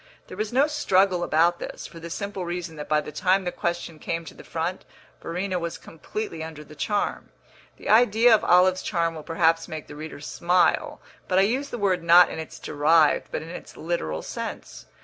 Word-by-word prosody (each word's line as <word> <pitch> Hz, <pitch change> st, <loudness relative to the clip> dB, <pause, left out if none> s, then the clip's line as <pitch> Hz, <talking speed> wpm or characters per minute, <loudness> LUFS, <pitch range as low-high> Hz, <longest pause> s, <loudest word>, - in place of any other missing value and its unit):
There -, -, -8 dB
was 215 Hz, 0 st, -2 dB
no 265 Hz, +4 st, +4 dB
struggle 195 Hz, -, +2 dB
about 170 Hz, +1 st, +2 dB
this, -, -, -7 dB
for 165 Hz, -, -10 dB
the 170 Hz, +1 st, -8 dB
simple 200 Hz, +1 st, -4 dB
reason 175 Hz, -1 st, -5 dB
that 150 Hz, -, -7 dB
by 155 Hz, 0 st, +3 dB
the 150 Hz, -, -8 dB
time 185 Hz, +5 st, +2 dB
the 180 Hz, -, -2 dB
question 170 Hz, -2 st, -3 dB
came 165 Hz, +2 st, -3 dB
to -, -, -10 dB
the -, -, -13 dB
front 170 Hz, +3 st, -3 dB, 0.4 s
Verena 180 Hz, +2 st, -2 dB
was 170 Hz, -1 st, -4 dB
completely 165 Hz, +1 st, -6 dB
under 160 Hz, -1 st, -8 dB
the 150 Hz, -, -14 dB
charm. 205 Hz, +6 st, -2 dB, 0.5 s
The -, -, -10 dB
idea 230 Hz, +1 st, +5 dB
of 220 Hz, -, +4 dB
Olive's 185 Hz, +1 st, +4 dB
charm 170 Hz, -2 st, -1 dB
will 160 Hz, -, -7 dB
perhaps 165 Hz, 0 st, +1 dB
make 155 Hz, -1 st, -6 dB
the 145 Hz, -, -11 dB
reader 155 Hz, 0 st, -8 dB
smile; 175 Hz, +4 st, +1 dB, 0.3 s
but 185 Hz, -, +1 dB
I 190 Hz, -, +6 dB
use 260 Hz, +7 st, 0 dB
the 240 Hz, -, -5 dB
word 190 Hz, -4 st, +1 dB
not 170 Hz, +1 st, +7 dB
in -, -, -5 dB
its 160 Hz, -, -8 dB
derived, 150 Hz, +1 st, +3 dB
but -, -, -3 dB
in 160 Hz, -, -10 dB
its 175 Hz, -, -10 dB
literal 155 Hz, -, -3 dB
sense. -, -, -7 dB
170 Hz, 205 wpm, -25 LUFS, 160-190 Hz, 0.5 s, not